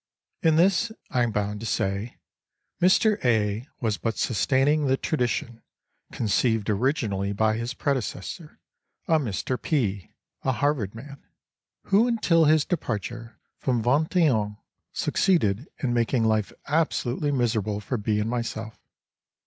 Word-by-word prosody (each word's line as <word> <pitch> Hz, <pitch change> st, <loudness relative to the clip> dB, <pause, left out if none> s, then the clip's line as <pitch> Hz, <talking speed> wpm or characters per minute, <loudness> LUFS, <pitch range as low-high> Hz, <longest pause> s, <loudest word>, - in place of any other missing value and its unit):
In 160 Hz, -4 st, +4 dB
this, 195 Hz, +6 st, +3 dB, 0.2 s
I 125 Hz, -, +1 dB
am 120 Hz, -, +2 dB
bound 105 Hz, 0 st, -2 dB
to 115 Hz, -, -5 dB
say, 100 Hz, +3 st, -2 dB, 0.6 s
Mr. 205 Hz, +4 st, +4 dB
A. 110 Hz, 0 st, +1 dB
was 110 Hz, -4 st, 0 dB
but 115 Hz, -2 st, -2 dB
sustaining 135 Hz, +5 st, +2 dB
the 135 Hz, 0 st, +2 dB
tradition 120 Hz, -5 st, -2 dB, 0.5 s
conceived 110 Hz, -1 st, +1 dB
originally 105 Hz, -4 st, 0 dB
by 110 Hz, +1 st, +2 dB
his 115 Hz, +3 st, -4 dB
predecessor, 140 Hz, -, -3 dB, 0.5 s
a 160 Hz, -1 st, +4 dB
Mr. 125 Hz, 0 st, -3 dB
P., 105 Hz, -, -1 dB, 0.3 s
a 130 Hz, -, 0 dB
Harvard 125 Hz, -7 st, 0 dB
man, 140 Hz, +4 st, -11 dB, 0.6 s
who 210 Hz, +5 st, +3 dB
until 180 Hz, -9 st, +3 dB
his 155 Hz, 0 st, +4 dB
departure 115 Hz, -, -4 dB, 0.2 s
from 125 Hz, -4 st, 0 dB
Vingt 145 Hz, -, +1 dB
et 170 Hz, -3 st, +5 dB
Un 105 Hz, -3 st, -1 dB, 0.3 s
succeeded 135 Hz, -, +1 dB, 0.2 s
in 125 Hz, -3 st, +1 dB
making 120 Hz, 0 st, +1 dB
life 110 Hz, -2 st, +1 dB
absolutely 145 Hz, -2 st, 0 dB
miserable 110 Hz, -6 st, 0 dB
for 115 Hz, +5 st, -3 dB
B. 105 Hz, 0 st, 0 dB
and 105 Hz, -, -1 dB
myself. 115 Hz, -2 st, -4 dB
120 Hz, 135 wpm, -25 LUFS, 110-145 Hz, 0.6 s, et